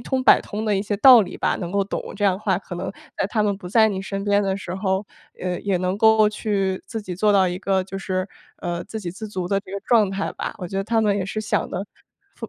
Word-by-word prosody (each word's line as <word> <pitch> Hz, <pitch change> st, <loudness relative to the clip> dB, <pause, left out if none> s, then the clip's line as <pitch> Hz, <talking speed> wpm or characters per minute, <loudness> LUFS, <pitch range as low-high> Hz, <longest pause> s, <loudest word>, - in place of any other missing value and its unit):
通 260 Hz, -1 st, -1 dB
百 -, -, +7 dB
通 215 Hz, +2 st, -5 dB
的 210 Hz, -2 st, +1 dB
一 -, -, 0 dB
些 205 Hz, 0 st, -2 dB
道 250 Hz, +1 st, +9 dB
理 190 Hz, -, -7 dB
吧， -, -, 0 dB
能 175 Hz, -2 st, -5 dB
够 200 Hz, 0 st, +2 dB
懂。 195 Hz, -, -5 dB
这 205 Hz, -, -1 dB
样 195 Hz, -, +4 dB
的 -, -, -7 dB
话 195 Hz, -3 st, +1 dB
可 185 Hz, -2 st, -9 dB
能 175 Hz, -, -4 dB, 0.3 s
在 -, -, 0 dB
他 215 Hz, 0 st, +1 dB
们 205 Hz, -1 st, 0 dB
不 180 Hz, -2 st, -9 dB
在 220 Hz, +3 st, +5 dB
你 195 Hz, -3 st, -3 dB
身 195 Hz, +1 st, -4 dB
边 205 Hz, 0 st, +3 dB
的 195 Hz, -1 st, 0 dB
时 190 Hz, -3 st, -6 dB
候， 190 Hz, +1 st, -1 dB, 0.4 s
呃， 180 Hz, -1 st, -2 dB
也 200 Hz, -2 st, 0 dB
能 185 Hz, +2 st, -1 dB
够 220 Hz, -1 st, +5 dB
去 200 Hz, -3 st, -1 dB
自 225 Hz, -3 st, -5 dB
己 185 Hz, -3 st, -5 dB
做 210 Hz, +2 st, +3 dB
到 190 Hz, -2 st, +4 dB
一 180 Hz, 0 st, -4 dB
个 190 Hz, 0 st, +1 dB
就 195 Hz, +1 st, -6 dB
是， 185 Hz, 0 st, -2 dB, 0.3 s
呃， 175 Hz, -1 st, -3 dB
自 220 Hz, +1 st, -6 dB
给 180 Hz, -4 st, -4 dB
自 215 Hz, +5 st, -8 dB
足 185 Hz, -3 st, -4 dB
的 195 Hz, -, +2 dB
这 195 Hz, -, -13 dB
个 200 Hz, -, -4 dB
状 220 Hz, -1 st, +3 dB
态 195 Hz, +1 st, -3 dB
吧。 -, -, -5 dB
我 180 Hz, -, -5 dB
觉 195 Hz, -, -5 dB
得 195 Hz, -, -1 dB
他 225 Hz, +2 st, +1 dB
们 210 Hz, -2 st, +2 dB
也 195 Hz, -, -1 dB
是 215 Hz, +2 st, -3 dB
想 215 Hz, -, -1 dB
的 195 Hz, -, -4 dB, 0.5 s
负 -, -, -7 dB
195 Hz, 305 characters per minute, -23 LUFS, 190-210 Hz, 0.5 s, 道